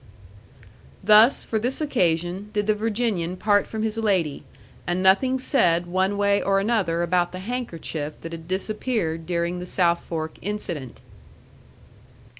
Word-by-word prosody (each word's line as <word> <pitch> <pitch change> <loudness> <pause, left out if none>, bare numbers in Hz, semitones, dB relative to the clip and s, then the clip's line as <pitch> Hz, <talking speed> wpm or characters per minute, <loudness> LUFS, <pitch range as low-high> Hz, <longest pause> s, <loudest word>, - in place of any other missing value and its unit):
Thus, 215 +5 +6
for 220 - -2
this 250 +5 -1
occasion, 185 - 0
did 210 0 0
the 215 - +3
Virginian 210 -5 -1
part 205 0 +2
from 220 -1 -4
his 220 0 -1
lady 185 -9 0 0.4
and 175 +2 0
nothing 255 +8 +4
said 175 - +2
one 190 +3 0
way 200 0 +2
or 195 0 +2
another 195 -6 0
about 175 0 +1
the - - -5
handkerchief 185 -8 -5
that 165 - -7
had 165 -1 -8
disappeared 190 -3 -2
during 175 0 -1
the 180 - -7
South 170 -2 +1
Fork 160 -1 -5
incident. 175 - -5
190 Hz, 140 wpm, -24 LUFS, 170-215 Hz, 0.4 s, Thus